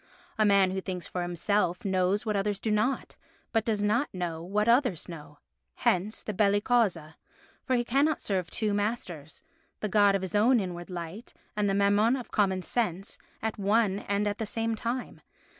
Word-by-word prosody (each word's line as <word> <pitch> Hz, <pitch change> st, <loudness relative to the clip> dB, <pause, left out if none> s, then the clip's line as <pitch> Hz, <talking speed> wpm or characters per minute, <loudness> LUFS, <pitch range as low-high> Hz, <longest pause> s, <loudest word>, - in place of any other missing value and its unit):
A 215 Hz, -, +5 dB
man 200 Hz, -2 st, +4 dB
who 190 Hz, 0 st, -2 dB
thinks 180 Hz, -3 st, -5 dB
for 180 Hz, -, -4 dB
himself 175 Hz, +2 st, 0 dB
knows 190 Hz, +2 st, +1 dB
what 215 Hz, -1 st, 0 dB
others 200 Hz, 0 st, 0 dB
do 220 Hz, -, -1 dB
not, 215 Hz, +6 st, 0 dB, 0.3 s
but 225 Hz, -2 st, +2 dB
does 215 Hz, -3 st, 0 dB
not 235 Hz, +7 st, +1 dB
know 175 Hz, -3 st, -4 dB
what 205 Hz, +5 st, -1 dB
others 235 Hz, -, +2 dB
know. 150 Hz, -3 st, -10 dB, 0.4 s
Hence 195 Hz, +5 st, 0 dB
the 215 Hz, -, -4 dB
belli 205 Hz, +1 st, +3 dB
causa, 195 Hz, -10 st, +1 dB, 0.5 s
for 260 Hz, -, +2 dB
he 240 Hz, -, +1 dB
cannot 275 Hz, +5 st, +2 dB
serve 185 Hz, -4 st, -2 dB
two 215 Hz, +1 st, -1 dB
masters, 200 Hz, -8 st, -3 dB, 0.4 s
the 215 Hz, -, -2 dB
God 205 Hz, 0 st, +4 dB
of 195 Hz, -, -1 dB
his 185 Hz, -, -5 dB
own 230 Hz, +4 st, +4 dB
inward 175 Hz, -3 st, -5 dB
light 175 Hz, +5 st, -7 dB, 0.2 s
and 210 Hz, -1 st, +1 dB
the 195 Hz, -, +1 dB
Mammon 205 Hz, +4 st, +3 dB
of 250 Hz, -3 st, -7 dB
common 190 Hz, -3 st, +1 dB
sense, 195 Hz, -5 st, -2 dB, 0.2 s
at 220 Hz, -1 st, -2 dB
one 200 Hz, 0 st, +2 dB
and 200 Hz, +1 st, +1 dB
the 205 Hz, +2 st, -2 dB
same 225 Hz, +1 st, -1 dB
time. 240 Hz, +3 st, -4 dB
205 Hz, 180 wpm, -28 LUFS, 185-220 Hz, 0.5 s, A